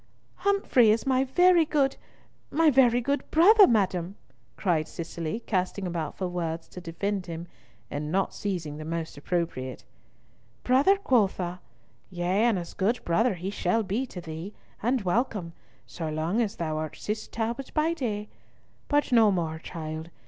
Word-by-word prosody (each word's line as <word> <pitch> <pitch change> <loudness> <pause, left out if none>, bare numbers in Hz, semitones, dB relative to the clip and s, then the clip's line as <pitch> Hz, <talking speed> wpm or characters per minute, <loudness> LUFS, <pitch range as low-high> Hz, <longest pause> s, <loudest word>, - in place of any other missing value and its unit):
"Humfrey 395 - +3
is 220 +1 +2
my 260 -1 +3
very 355 +5 +5
good—my 300 +1 -1
very 245 -2 +4
good 280 +4 -2
brother, 400 +6 +7
madam," 190 -4 +1 0.4
cried 165 -5 +1
Cicely, 165 +5 -5
casting 190 -2 -1
about 170 -4 -3
for 185 - -2
words 165 -2 -3
to 180 - -9
defend 185 +3 -3
him, 165 0 -5 0.5
and 150 +1 -3
not 195 +2 0
seizing 170 -7 -4
the 155 - -6
most 165 0 -4
appropriate. 145 -4 -3 0.8
"Brother, 275 +11 +4
quotha? 195 - +1 0.5
Yea, 185 +4 +1
and 230 -5 +3
as 170 -1 -6
good 220 +5 0
brother 205 +6 +2
he 180 +3 -4
shall 205 +3 0
be 215 +7 -2
to 185 - -8
thee, 165 +5 -7 0.3
and 240 +1 +1
welcome, 195 -3 -1 0.3
so 165 -3 -5
long 160 +8 0
as 220 -1 -1
thou 155 -2 -2
art 155 0 -4
Cis 215 +1 -4
Talbot 235 +4 -3
by 315 +2 +2
day—but 255 +3 -4
no 225 -3 +6
more, 165 -4 -2
child. 160 -1 -6
195 Hz, 150 wpm, -27 LUFS, 170-245 Hz, 0.8 s, brother